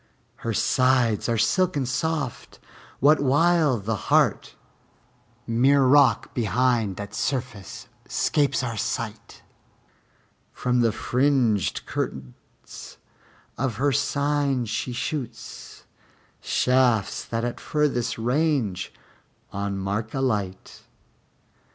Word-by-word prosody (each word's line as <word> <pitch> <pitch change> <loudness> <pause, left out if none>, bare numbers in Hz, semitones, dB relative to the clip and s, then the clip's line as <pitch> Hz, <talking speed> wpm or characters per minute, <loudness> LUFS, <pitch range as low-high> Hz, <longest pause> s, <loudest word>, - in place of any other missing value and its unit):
Her 115 - -3
sides 125 -1 +2
are 115 - +1
silken 140 - +1
soft, 145 0 -3 0.4
what 150 +4 +5
while 145 0 +3
the 110 +2 -2
heart - - +2 0.9
Mere 135 +4 +3
rock 140 +1 +4
behind 115 -2 +1
that 100 +1 -7
surface 120 -7 -4 0.2
'scapes 145 -3 +1
our 120 -3 -3
sight; - - -5 1.1
From 125 0 0
the 115 -2 +3
fringed 125 - +1
curtains 65 -2 -7 0.6
of 130 -4 -1
her 140 +5 +1
cyne 140 -2 0
she 115 +3 -3
shoots 130 +1 -6 0.6
Shafts 125 -4 +1
that 115 0 -2
at 120 - -4
furthest 145 -6 -1
range 125 - 0 0.6
on 100 0 -3
mark 105 +4 -3
alight. 105 -8 -2
125 Hz, 95 wpm, -24 LUFS, 110-140 Hz, 1.1 s, what